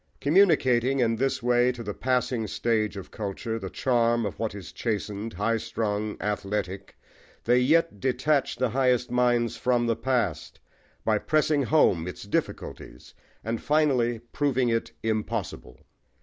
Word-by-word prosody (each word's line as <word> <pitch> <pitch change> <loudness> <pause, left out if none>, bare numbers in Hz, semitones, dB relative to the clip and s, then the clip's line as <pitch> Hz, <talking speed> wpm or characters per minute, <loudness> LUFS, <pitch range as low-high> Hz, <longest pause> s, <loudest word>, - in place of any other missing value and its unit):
Communicating, 135 -7 +3
in 115 -2 +2
this 135 0 -1
way, 125 +1 +3
to 120 -1 -8
the 105 -1 -4
passing 125 -2 -1
stage 110 -1 -1
of 95 - -9
culture, 110 +2 -4
the 95 - -6
charm 120 -1 +1
of 100 - -5
what 110 -2 -2
is 100 -3 -9
chastened, 105 -1 -3
high 115 +5 0
strung, 110 -2 -3
athletic, 100 -2 -3 0.5
they 120 +2 +4
yet 155 -2 +2
detach 130 +3 +1
the 125 +1 0
highest 125 -1 +1
minds 120 -2 +1
from 120 -1 +1
the 115 -1 +1
past, 115 -9 -2 0.5
by 110 -1 +2
pressing 155 +1 +2
home 120 - +3
its 90 - -7
difficulties 100 - -4 0.3
and 115 +1 -3
finally 135 -6 +2
proving 130 -4 +1
it 115 0 -1
impossible. 110 - -3
115 Hz, 140 wpm, -26 LUFS, 105-125 Hz, 0.5 s, they